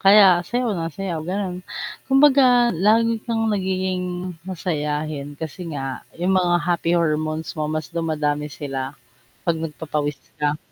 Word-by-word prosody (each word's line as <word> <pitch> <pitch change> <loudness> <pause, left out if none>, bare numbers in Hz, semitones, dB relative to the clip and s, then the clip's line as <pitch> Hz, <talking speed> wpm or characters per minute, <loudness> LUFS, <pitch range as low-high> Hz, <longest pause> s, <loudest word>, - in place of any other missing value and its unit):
Kaya 195 -3 +7
sayaw 245 -2 0
ng 165 -3 -2
sayaw 185 -5 -3
ganon, 185 -1 -2 0.5
kumbaga 265 -3 +6
lagi 225 +5 +3
kang 225 -1 0
nagiging 185 -2 -1 0.2
masayahin 150 -4 -3
kasi 165 +3 -6
nga 135 -1 -5
yung 180 +3 +1
mga 175 -1 +3
happy 170 0 +2
hormones 155 -1 0
mo 155 -1 -2
mas 155 0 -3
dumadami 150 -3 -1
sila 135 -1 -5 0.5
pag 170 - +3
nagpapawis 150 -2 -3 0.2
ka. 150 0 0
170 Hz, 130 wpm, -22 LUFS, 150-195 Hz, 0.5 s, Kaya